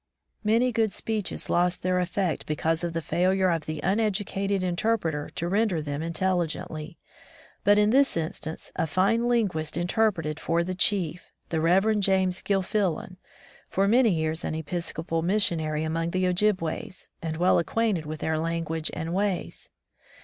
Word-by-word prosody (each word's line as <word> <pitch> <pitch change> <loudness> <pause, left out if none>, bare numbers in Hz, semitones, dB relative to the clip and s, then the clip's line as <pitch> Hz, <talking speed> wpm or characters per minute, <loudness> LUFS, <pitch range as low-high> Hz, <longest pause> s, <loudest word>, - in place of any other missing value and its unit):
Many 230 +4 +3
good 220 -2 +1
speeches 215 -2 -3
lost 175 +1 +1
their 185 0 +2
effect 180 -1 -1
be 150 - -1
cause 160 +2 0
of 170 -1 -2
the 165 -1 -2
failure 185 +3 +2
of 165 -2 -2
the 155 -1 -3
uneducated 200 -1 0
inter 185 +6 +1
preter 155 -6 -3
to 170 - -2
render 200 -2 +1
them 145 -1 -4
intelligently, 165 -1 -2 0.7
but 205 0 +5
in 210 0 +4
this 275 -5 +4
instance 160 0 -4
a - - 0
fine 200 +9 +2
linguist 190 -11 0
interpreted 175 -4 0
for 170 +1 +1
the 185 +2 -3
chief, 180 -3 0 0.2
the 160 -2 0
Rev. 195 +6 +3
James 190 -2 +2
GilfiUan, 190 -2 -1 0.5
for 195 +1 +1
many 235 +2 +5
years 160 -2 -1
an - - -2
Episcopal 165 0 -3
missionary 165 -5 +1
among 165 +1 -1
the 185 +1 0
Ojibways 180 -2 0
and 160 -1 -3
well 180 +2 +4
acquainted 190 -3 0
with 155 -1 -6
their 160 -1 0
language 165 -1 -2
and 165 +1 -3
ways. 195 -1 -2
180 Hz, 155 wpm, -26 LUFS, 160-200 Hz, 0.7 s, but